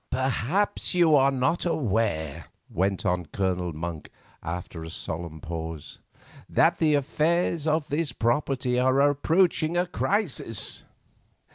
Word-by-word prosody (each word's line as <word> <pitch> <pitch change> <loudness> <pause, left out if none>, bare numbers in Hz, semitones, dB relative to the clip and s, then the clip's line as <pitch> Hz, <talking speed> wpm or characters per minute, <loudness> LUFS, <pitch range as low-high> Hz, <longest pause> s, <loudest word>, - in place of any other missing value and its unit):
"Perhaps 135 - 0
you 170 -3 +5
are 135 -2 +6
not 135 +5 0
aware," 110 - -1 0.3
went 95 +2 0
on 90 -2 0
Colonel 90 -2 -1
Monk, 80 0 -6 0.3
after 85 -1 -6
a 80 - -7
solemn 80 -1 -5
pause, 80 -1 -6 0.5
"that - - +3
the 155 -2 +3
affairs 155 +3 0
of 155 -1 +1
this 150 -1 -1
property 125 +1 0
are 130 +1 +3
approaching 165 +2 +2
a 175 - +2
crisis." 175 - -2
130 Hz, 120 wpm, -26 LUFS, -, 0.5 s, are